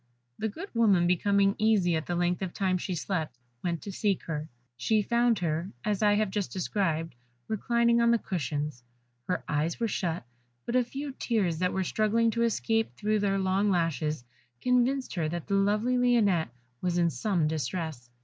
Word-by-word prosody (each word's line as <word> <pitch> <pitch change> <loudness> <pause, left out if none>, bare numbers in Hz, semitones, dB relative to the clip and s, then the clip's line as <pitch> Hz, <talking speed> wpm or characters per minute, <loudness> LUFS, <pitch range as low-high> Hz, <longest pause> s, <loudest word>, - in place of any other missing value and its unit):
The 220 - 0
good 345 - -8
woman 205 -7 +4
becoming 195 +3 +3
uneasy 210 -6 +3
at 160 - -3
the 175 - -1
length 175 +1 0
of 185 -2 -4
time 185 -2 +1
she 185 0 -3
slept, 160 -6 -3 0.3
went 170 -2 -2
to 200 - -5
seek 195 0 0
her; 155 -1 -4 0.3
she 210 - +1
found 235 +1 +2
her, 170 +1 -1 0.2
as 210 -1 0
I 205 -1 +4
have 210 -2 +1
just 205 -2 -2
described, 165 -5 -1 0.3
reclining 235 +2 +2
on 235 - +4
the 235 - +5
cushions; 145 - -3 0.4
her 180 - -1
eyes 155 +2 -1
were 230 - +1
shut, 170 - -2 0.4
but 235 - -2
a 255 - +5
few 275 +4 -5
tears 200 -11 0
that 180 0 +1
were 190 - 0
struggling 220 +4 +2
to 235 - -1
escape 225 -1 +1
through 215 0 0
their 195 -1 +1
long 195 +2 +1
lashes, 155 -6 0 0.3
convinced 250 - +1
her 160 -4 -1
that 170 0 -4
the 200 - -3
lovely 210 +5 +2
Lionette 215 - +3 0.3
was 180 -1 0
in 170 -1 +3
some 165 - 0
distress. 155 -5 -3
195 Hz, 180 wpm, -28 LUFS, 170-220 Hz, 0.4 s, the